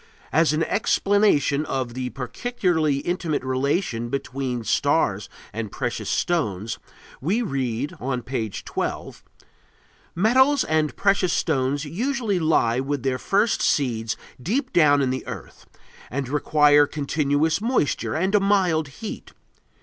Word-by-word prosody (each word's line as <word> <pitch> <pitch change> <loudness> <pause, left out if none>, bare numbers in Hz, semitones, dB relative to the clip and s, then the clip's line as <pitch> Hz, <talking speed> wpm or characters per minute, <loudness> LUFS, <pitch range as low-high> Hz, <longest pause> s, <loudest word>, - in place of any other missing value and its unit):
As 160 0 +4
an 155 +1 +1
explanation 200 -7 +2
of 130 -5 -3
the 125 0 -3
peculiarly 155 - -1
intimate 170 -4 -2
relation 130 -2 -1
between 130 -2 -3
stars - - +1 0.2
and 110 -2 -4
precious 120 -2 -3
stones 110 - -1 0.4
we 200 - +1
read, 135 - -2
on 125 -1 -3
page 115 -6 -4
12: - - -4 0.9
Metals 260 +9 +4
and 155 -1 0
precious 195 -2 +2
stones 135 +2 0
usually 225 - -1
lie 130 -7 +2
with 135 0 -2
their 130 -1 0
first 205 - +1
seeds 115 -6 0 0.2
deep 260 - -1
down 145 -4 +5
in 130 - 0
the 130 - -4
earth - - -9 0.4
and 135 +1 -3
require 145 0 +4
continuous 150 +3 0
moisture 230 - 0
and 190 +5 0
a 210 - +5
mild 185 -6 +2
heat. 175 +10 -8
145 Hz, 125 wpm, -23 LUFS, 130-185 Hz, 0.9 s, down